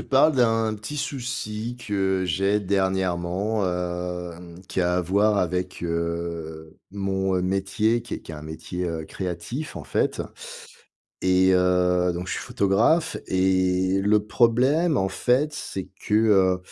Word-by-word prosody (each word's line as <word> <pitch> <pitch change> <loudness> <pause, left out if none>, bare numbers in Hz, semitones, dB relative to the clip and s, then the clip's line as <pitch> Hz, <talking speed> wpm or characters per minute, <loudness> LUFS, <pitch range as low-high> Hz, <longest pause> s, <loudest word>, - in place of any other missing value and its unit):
parle 140 +3 +4
d'un 115 -3 +2
petit 110 +8 -7
souci 120 -4 -4
que 95 -2 0
j'ai 95 +4 +1
dernièrement, 95 +1 0
hem, 90 -1 -4
qui - - -1
a 90 0 +2
à - - +2
voir 100 +4 +2
avec, 90 0 -2
heu, 85 -1 -4
mon, 95 -1 -1
heu, 90 - 0
métier, 100 +5 +1
qui 120 - -6
est - - -6
qui - - -10
est - - -5
un 75 - -9
métier, 80 +3 -5
heu, 80 -2 -3
créatif 100 - -5
en - - -7
fait - - 0 1.0
et 95 0 +4
heu, 90 0 +3
donc 90 +1 -5
je - - -2
suis - - -3
photographe 115 - +2
et 95 0 +2
le 105 +1 +2
problème 130 +9 +3
en 95 - +1
fait 130 +9 +1
c'est 95 -10 -5 0.2
que, - - -4
heu, 100 -4 +4
95 Hz, 145 wpm, -24 LUFS, 90-110 Hz, 1.0 s, parle